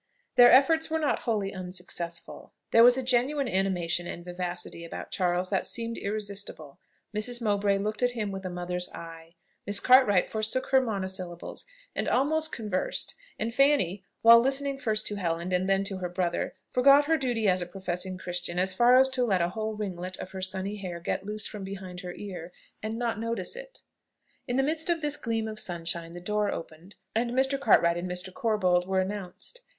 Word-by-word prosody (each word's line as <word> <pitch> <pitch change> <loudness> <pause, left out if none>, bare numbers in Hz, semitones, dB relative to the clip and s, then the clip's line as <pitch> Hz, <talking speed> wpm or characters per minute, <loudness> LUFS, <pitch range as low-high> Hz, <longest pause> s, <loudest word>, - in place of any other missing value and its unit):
Their 245 0 +8
efforts 320 +5 +5
were 320 - 0
not 305 -3 0
wholly 205 -3 0
unsuccessful. 180 -2 -6 0.2
There 230 - +7
was 245 +1 +7
a 260 - -1
genuine 260 +3 +1
animation 180 -4 0
and 175 - -7
vivacity 175 -1 -3
about 170 - -8
Charles 180 0 0
that 190 - 0
seemed 230 0 -2
irresistible: 200 -8 -4 0.4
Mrs. 240 +3 +2
Mowbray 205 -3 +1
looked 210 +3 -3
at 245 0 +2
him 215 -4 -3
with 195 0 -6
a 185 - -4
mother's 180 0 -2
eye; 165 0 -10 0.3
Miss 205 0 +4
Cartwright 250 -7 +5
forsook 220 +4 -1
her 265 -1 +6
monosyllables, 190 -6 -3 0.3
and - - -1
almost 315 +5 +2
conversed; 210 -5 -2 0.2
and 230 +2 -3
Fanny, 255 - +3 0.2
while 230 0 +9
listening 270 +2 0
first 215 -4 -1
to 205 - -2
Helen, 170 -1 -2
and 185 +1 +1
then 195 0 +3
to 195 -1 -3
her 180 -1 -3
brother, 175 -1 -2 0.2
forgot 275 +3 +6
her 325 +2 +3
duty 245 -7 0
as 185 -1 +3
a 175 - -4
professing 185 0 -4
Christian 175 -1 -4
as 185 +1 +2
far 240 +5 +5
as 265 +1 +6
to 260 -1 0
let 195 -6 +2
a 170 - 0
whole 220 +3 -4
ringlet 185 -3 -5
of 185 - -8
her 190 0 -6
sunny 190 +2 -3
hair 180 -4 -6
get 190 +3 -3
loose 210 0 -3
from 205 -2 -7
behind 190 -2 -7
her 180 -1 -6
ear, 180 -4 -8 0.3
and 220 +1 -4
not 235 -3 -2
notice 230 - -3
it. - - -11 0.6
In 245 - -1
the 270 - +3
midst 315 +4 +1
of 335 -2 0
this 295 0 +1
gleam 225 -4 -2
of 215 -1 -6
sunshine 170 -2 -3
the 175 - -7
door 210 +3 -1
opened, 165 +4 -8 0.2
and 235 +2 0
Mr. 265 +2 +1
Cartwright 170 -8 +4
and 175 +1 -4
Mr. 180 +1 -4
Corbold 185 -5 +1
were 190 0 +1
announced. 195 - -5
200 Hz, 190 wpm, -28 LUFS, 180-240 Hz, 0.6 s, while